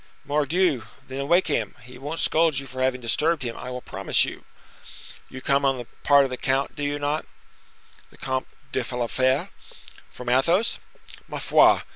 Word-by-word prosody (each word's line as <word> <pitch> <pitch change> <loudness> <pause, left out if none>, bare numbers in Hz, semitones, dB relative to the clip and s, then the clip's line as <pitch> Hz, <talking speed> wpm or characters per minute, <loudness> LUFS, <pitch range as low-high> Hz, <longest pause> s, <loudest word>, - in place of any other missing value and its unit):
"Mordioux! 150 0 +2 0.3
then 135 +1 -4
wake 175 +4 +4
him. 115 -9 -1
He 125 +2 -12
won't 150 +5 -4
scold 160 -3 +3
you 135 - -2
for 130 0 -6
having 130 -1 +1
disturbed 150 +6 +1
him, 115 -2 -4
I - - -7
will 125 0 -5
promise - - +1
you." - - -8 0.8
"You 130 - -8
come 140 +1 +2
on 135 -1 +2
the 120 - -6 0.2
part 140 -1 +6
of 135 - -2
the 125 - -3
count, 135 +2 0
do 145 - -5
you 145 0 -1
not?" 145 +2 -2 0.8
"The - - -19
Comte 130 0 -2 0.2
de 130 - 0
la 120 -1 0
Fere?" 130 +2 +1 0.6
"From 125 - -10
Athos?" 165 - +2 0.5
"Ma - - -5
foi! - - +5
135 Hz, 180 wpm, -25 LUFS, 130-150 Hz, 0.8 s, part